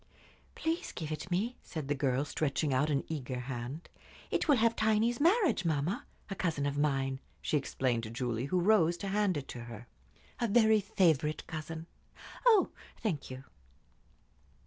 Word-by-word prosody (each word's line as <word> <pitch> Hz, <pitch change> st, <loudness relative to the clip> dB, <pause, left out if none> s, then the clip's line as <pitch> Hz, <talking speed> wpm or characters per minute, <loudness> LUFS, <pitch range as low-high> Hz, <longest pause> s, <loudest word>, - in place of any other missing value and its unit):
"Please 325 Hz, +2 st, -2 dB
give 155 Hz, -2 st, -5 dB
it 155 Hz, +4 st, -4 dB
me," 210 Hz, +8 st, -1 dB
said 155 Hz, -5 st, -6 dB
the 145 Hz, -, +1 dB
girl, 135 Hz, 0 st, +1 dB
stretching 145 Hz, -1 st, 0 dB
out 140 Hz, +4 st, +2 dB
an 140 Hz, -2 st, +1 dB
eager 130 Hz, -5 st, -4 dB
hand. 125 Hz, +5 st, -5 dB, 0.4 s
"It -, -, +1 dB
will 290 Hz, -, +6 dB
have 230 Hz, -1 st, +3 dB
Tiny's 220 Hz, +2 st, +2 dB
marriage, 345 Hz, -, +3 dB
mamma! 160 Hz, +2 st, -1 dB, 0.2 s
A -, -, -4 dB
cousin 160 Hz, -7 st, -1 dB
of 140 Hz, 0 st, -1 dB
mine," 135 Hz, -2 st, 0 dB, 0.2 s
she -, -, -1 dB
explained 130 Hz, -4 st, 0 dB
to 110 Hz, -, -6 dB
Julie, 120 Hz, 0 st, -2 dB
who 180 Hz, +6 st, +1 dB
rose 175 Hz, -3 st, +4 dB
to 200 Hz, -, -4 dB
hand 200 Hz, -4 st, +2 dB
it 140 Hz, -, -5 dB
to 120 Hz, -1 st, -6 dB
her. 120 Hz, 0 st, -9 dB, 0.5 s
"A 235 Hz, -, +1 dB
very 220 Hz, 0 st, +5 dB
favorite 160 Hz, -6 st, +2 dB
cousin. 160 Hz, +1 st, -6 dB, 0.6 s
Oh, 435 Hz, -5 st, +6 dB, 0.3 s
thank 175 Hz, -11 st, -1 dB
you." 130 Hz, 0 st, -7 dB
155 Hz, 165 wpm, -32 LUFS, 135-205 Hz, 0.6 s, will